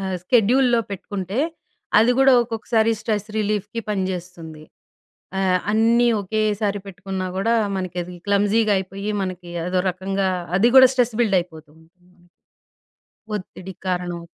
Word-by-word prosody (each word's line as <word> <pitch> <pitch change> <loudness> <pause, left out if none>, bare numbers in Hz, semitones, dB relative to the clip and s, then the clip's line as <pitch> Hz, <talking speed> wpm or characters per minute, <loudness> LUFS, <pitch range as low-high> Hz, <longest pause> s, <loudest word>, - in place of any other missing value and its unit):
ఆహ్, 190 -1 -3
స్కెడ్యూల్లో 240 +3 +3
పెట్టుకుంటే, 195 +1 -5 0.6
అది 230 +3 +4
గూడా 270 0 +6
ఒక్కొక్కసారి 225 -1 0
స్ట్రెస్ 210 -2 -2
రిలీఫ్‌కి 210 +1 -2
పనిచేస్తుంది. 180 -5 -5 0.8
ఆహ్, 185 -1 +2
అన్నీ 230 +2 +3
ఒకేసారి 210 0 -1
పెట్టుకున్నా 190 -1 -5
గూడా, 230 +4 +1 0.2
మనకది 180 -1 -5
క్లమ్జీగా 205 +2 +2
అయిపోయి, 195 +2 -5
మనకి 185 -2 -6 0.2
అదో 180 0 +1
రకంగా, 190 +1 -2 0.3
అది 235 +5 +4
కూడా 260 -1 +10
స్ట్రెస్ 245 -3 +1
బిల్డయిపోతుంది. 160 -6 -3 1.5
ఒత్తిడి 190 -1 -7
కారణం. 175 -2 -2
195 Hz, 110 wpm, -22 LUFS, 185-220 Hz, 1.5 s, కూడా